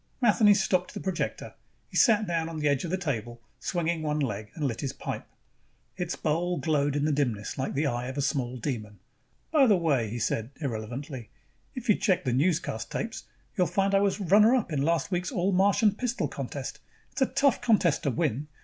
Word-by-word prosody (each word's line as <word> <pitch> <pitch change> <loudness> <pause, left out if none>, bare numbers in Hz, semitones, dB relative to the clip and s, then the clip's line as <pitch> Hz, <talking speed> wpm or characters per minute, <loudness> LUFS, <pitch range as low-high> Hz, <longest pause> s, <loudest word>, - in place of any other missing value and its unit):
Matheny 210 -4 +5
stopped 185 -2 0
the - - -3
projector. 190 -2 -3 0.3
He - - -14
sat 220 -4 +5
down 165 -3 -1
on 165 - -6
the 150 -1 0
edge 140 -2 +1
of 170 - -3
the 185 - 0
table, 120 - -3 0.2
swinging 170 -2 -1
one 150 -1 -1
leg, 105 -6 -3
and 155 - -2
lit 120 -4 -2
his 135 -3 -3
pipe. - - -6 0.7
Its 180 -2 -3
bowl 175 +3 0
glowed 145 -4 +1
in 145 0 +1
the 155 - +2
dimness 125 -8 -1
like 130 - -3
the 145 +3 +1
eye 120 -2 -1
of 130 +2 -6
a - - +1
small 130 -3 -1
demon. 110 -5 -4 0.5
"By 295 -5 +5
the 205 -4 +5
way," 140 -10 +1
he 115 - -4
said 115 0 -1
irrelevantly, 125 -1 -5 0.5
"if 250 -1 -6
you 210 - +6
check 190 -2 +1
the 125 - +1
newscast 145 -5 0
tapes, 225 0 -4 0.3
you'll 180 -2 +2
find 195 0 +1
I 195 - +5
was 200 0 +1
runner 210 +6 +5
up 220 -10 -1
in 140 - 0
last 165 +5 +1
year's 180 0 -1
all 195 -4 0
Martian 200 +3 +3
pistol 245 +3 -2
contest. - - -6 0.3
It's - - -6
a 265 - +5
tough 275 -3 +2
contest 215 -10 +3
to - - 0
win. 130 +3 -1
160 Hz, 205 wpm, -28 LUFS, 135-195 Hz, 0.7 s, you